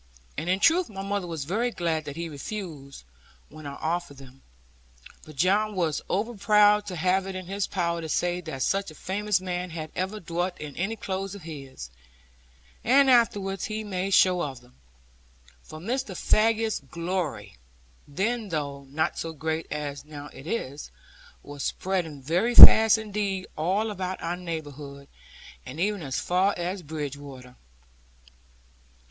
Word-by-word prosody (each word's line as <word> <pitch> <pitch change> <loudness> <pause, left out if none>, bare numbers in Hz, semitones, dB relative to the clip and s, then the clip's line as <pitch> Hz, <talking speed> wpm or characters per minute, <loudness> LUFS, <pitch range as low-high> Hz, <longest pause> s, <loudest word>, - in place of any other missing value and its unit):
And 160 +4 -3
in 185 +1 +2
truth 340 - +4
my 195 -2 -6
mother 200 -2 -2
was 160 -5 -4
very 220 - 0
glad 165 -7 -2
that 145 - -6
he 170 +1 -4
refused, 150 - -7 0.5
when 155 -1 -10
I 140 - -6
offered 165 -2 -3
them. 135 0 -15 0.9
But 155 - -11
John 200 +7 +2
was 165 -5 0
over 220 +5 -1
proud 210 0 +4
to 185 - -4
have 185 +3 +1
it 190 - -5
in 185 -1 -5
his 195 +1 -2
power 170 -2 -1
to 160 - -6
say 175 +2 0
that 145 -6 -4
such 195 -1 0
a 155 - -12
famous 205 +3 0
man 180 -1 -3
had 160 -2 -6
ever 190 +4 -2
dwelt 175 0 -3
in 150 -2 -7
any 195 +6 -2
clothes 195 -2 -4
of 200 - -11
his; 135 - -9 0.9
and 270 +2 +5
afterwards 200 -5 +2
he 215 0 -4
made 195 -1 0
show 180 -1 +5
of 135 -5 -4
them. 125 0 -21 0.9
For 155 - -11
Mr. 225 +3 -3
Faggus's 225 0 +2
glory, 165 - -4 0.5
then, 215 +8 -2
though 140 -4 -4
not 155 +5 -1
so 165 0 -4
great 160 +1 -3
as 145 -2 -4
now 145 -1 -9
it 135 - -11
is, 150 - -4 0.5
was 145 0 -9
spreading 170 -7 -2
very 180 - +1
fast 220 -1 +11
indeed 205 -3 -3
all 195 +8 0
about 185 -2 -4
our 170 +1 -1
neighbourhood, 145 -5 -7 0.5
and 130 +5 -9
even 205 +1 0
as 135 -3 -3
far 185 +3 +1
as 180 +2 -3
Bridgewater. 140 -4 -7
175 Hz, 155 wpm, -26 LUFS, 150-200 Hz, 0.9 s, fast